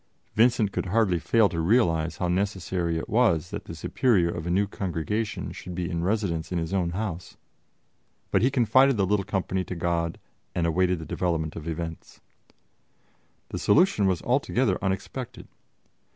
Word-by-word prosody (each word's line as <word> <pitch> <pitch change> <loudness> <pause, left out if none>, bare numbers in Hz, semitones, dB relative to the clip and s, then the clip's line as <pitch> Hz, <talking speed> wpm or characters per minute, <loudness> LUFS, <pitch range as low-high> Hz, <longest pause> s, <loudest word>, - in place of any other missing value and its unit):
Vincent 115 -2 +3
could - - -3
hardly 95 -3 +2
fail 110 +5 +3
to 85 -3 -4
realize 80 -4 +2
how 90 - -1
necessary 90 -2 -1
it 80 - -4
was 100 -8 +2
that - - -5
the - - -8
superior 100 -10 +2
of 85 -1 -5
a - - -1
new 95 +4 +2
Congregation 100 +3 -3
should 90 -1 -8
be 90 -1 -2
in 85 0 -2
residence 95 -5 -1
in 90 - -1
his 80 +2 -3
own 90 -3 +1
house, 90 -2 -5 0.9
but - - +3
he 125 - +4
confided 130 +1 +4
the 100 - +2
little 100 +1 +1
company 95 -1 -1
to 90 - -6
God 85 -1 -1 0.4
and 85 - +1
awaited 90 +2 +2
the 80 - -7
development 80 -4 -2
of 80 -1 -7
events. 80 0 -6 1.3
The - - -4
solution 160 - +4
was 90 -4 0
altogether - - +1
unexpected. 95 +6 -4
90 Hz, 165 wpm, -26 LUFS, 85-105 Hz, 1.3 s, he